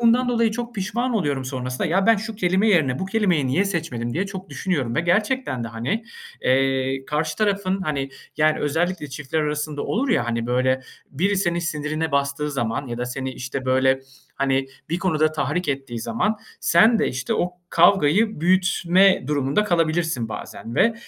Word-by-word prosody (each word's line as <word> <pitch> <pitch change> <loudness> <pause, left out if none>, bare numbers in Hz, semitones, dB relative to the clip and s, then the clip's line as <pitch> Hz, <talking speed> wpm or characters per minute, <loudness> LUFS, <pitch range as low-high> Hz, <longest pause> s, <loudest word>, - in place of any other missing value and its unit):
bundan 240 +2 +4
dolayı 230 -2 +2
çok 240 +1 -5
pişman 235 +6 -1
oluyorum 145 -10 0
sonrasında, 130 -1 -3
ya 190 +5 +1
ben, 225 - +6
şu 215 +2 -5
kelime 190 +2 +2
yerine 140 -10 +3
bu 190 - -3
kelimeyi 190 -9 +1
niye 145 +10 +2
seçmedim 125 -11 -3
diye 190 +4 0
çok 190 -1 -8
düşünüyorum 140 -11 -2
ve - - +2
gerçekten 190 - 0
de 115 - -4
hani, 120 - -3 0.4
eee, 135 0 +1
karşı 155 +1 -1
tarafın, 195 -2 0
hani, 140 -5 -2 0.3
yani, 155 0 +3
özellikle 160 +2 -1
çiftler 140 +3 -3
arasında 150 -1 -2
olur 265 +6 -1
ya, 120 - +2
hani, 115 0 -1
böyle, 130 +1 +1 0.3
biri 190 +8 0
senin 175 -3 +1
sinirine 155 -1 -2
bastığı 140 +1 0
zaman 120 -1 -2
ya 120 -1 -5
da 125 - -1
seni, 130 +1 -4
işte, 130 +1 -5
böyle, 130 +1 +3 0.4
hani, 135 -1 +1 0.2
bir 170 - 0
konuda 155 -4 +1
tahrik 175 +3 -1
ettiği 135 -4 -3
zaman, 165 - -1 0.2
sen 225 +1 +5
de 220 - +2
işte 130 -1 -2
o 175 - 0 0.2
kavgayı 190 +3 +4
büyütme 185 -1 +3
durumunda 145 +6 +1
kalabilirsin 165 - 0
bazen. 115 +1 -7
Ve, 230 0 +3
155 Hz, 170 wpm, -23 LUFS, 135-195 Hz, 0.4 s, ben